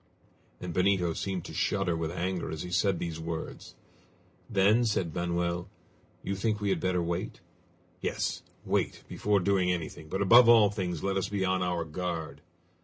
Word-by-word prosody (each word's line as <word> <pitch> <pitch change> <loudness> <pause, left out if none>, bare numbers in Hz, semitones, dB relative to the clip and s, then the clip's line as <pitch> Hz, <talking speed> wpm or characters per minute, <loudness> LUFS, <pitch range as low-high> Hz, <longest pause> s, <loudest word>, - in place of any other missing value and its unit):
And 90 -1 -5
Benito 90 -1 +2
seemed 95 0 -3
to - - -8
shudder 95 -4 0
with 80 -1 -2
anger 90 +1 -2
as 80 - -4
he 90 - -7
said 90 +1 +2
these 85 -1 -4
words. 80 0 -6 0.7
"Then," 105 +2 +4
said 95 -8 0
Manoel, 85 +1 -1 0.5
"you 100 - -2
think 105 +2 -1
we 100 -1 -1
had 95 -3 +1
better 90 0 0
wait?" 85 +2 -3 0.6
"Yes; - - -2 0.2
wait, - - -1
before 105 -1 +1
doing 95 -1 +2
anything, 80 -2 -5
but 95 +3 0
above 120 +4 +8
all 110 -3 +7
things 90 -6 -3
let 95 0 0
us 95 - -1
be 100 -2 -1
on 95 0 +1
our 90 -2 -1
guard!" 80 -3 -4
90 Hz, 170 wpm, -29 LUFS, 85-100 Hz, 0.7 s, above